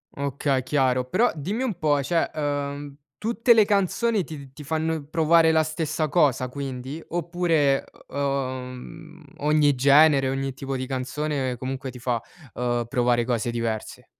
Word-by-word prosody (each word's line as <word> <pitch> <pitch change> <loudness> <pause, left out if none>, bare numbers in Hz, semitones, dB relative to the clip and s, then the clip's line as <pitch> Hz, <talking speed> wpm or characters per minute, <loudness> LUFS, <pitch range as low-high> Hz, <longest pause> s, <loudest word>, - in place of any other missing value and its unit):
Okay 140 -1 -1
chiaro, 130 -2 +1
però 230 - +2
dimmi 200 - -3
un 230 -8 -2
po' 145 -2 +2
cioè, 165 +4 0
ehm, 145 -1 -3 0.2
tutte 235 +2 +3
le 215 -2 +5
canzoni 205 +1 +1
ti 140 -3 -9
ti 150 - -10
fanno 160 +1 -1
provare 160 +1 +4
la 160 0 +3
stessa 155 0 -2
cosa 140 -5 +2
quindi? 135 +2 -6
Oppure, 165 -5 +1 0.2
uhm, 135 +3 -4 0.2
ogni 150 -1 +3
genere, 140 +1 +5
ogni 135 0 -2
tipo 135 0 -5
di 130 0 -4
canzone 135 0 -2
comunque 130 +2 -5
ti 125 - -11
fa, 120 -1 -1 0.3
uhm, 120 -1 -1
provare 120 -1 +2
cose 120 -1 -1
diverse? 115 -2 -4
140 Hz, 145 wpm, -24 LUFS, 130-160 Hz, 0.3 s, le